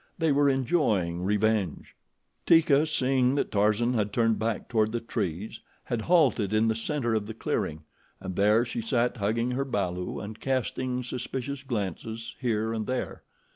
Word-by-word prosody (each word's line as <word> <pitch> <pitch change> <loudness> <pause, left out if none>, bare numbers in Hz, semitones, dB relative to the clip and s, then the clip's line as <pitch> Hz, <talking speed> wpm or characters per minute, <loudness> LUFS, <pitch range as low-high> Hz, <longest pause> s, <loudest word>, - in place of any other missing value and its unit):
They 160 -2 +2
were 140 0 +4
enjoying 115 - +1
revenge. 105 -2 0 0.5
Teeka, 160 -2 +5
seeing 130 -3 +2
that 145 - -1
Tarzan 105 +4 +2
had 105 -3 0
turned 115 0 +2
back 110 -1 -2
toward 110 -2 +1
the 120 - 0
trees, 105 -4 -4 0.2
had 120 -3 -2
halted 130 - +3
in 110 +1 +3
the 110 - +1
center 120 0 -1
of 105 -2 -1
the 110 - -7
clearing, 80 -7 -2 0.4
and 95 - -6
there 105 +5 +4
she 235 - -4
sat 125 - 0
hugging 115 +4 0
her 130 +2 0
balu 90 -8 -2
and 105 +2 -7
casting 130 -1 -1
suspicious 130 +2 -4
glances 115 - -4
here 110 -3 0
and 110 -2 -3
there. 130 0 -3
115 Hz, 160 wpm, -27 LUFS, 105-130 Hz, 0.5 s, Teeka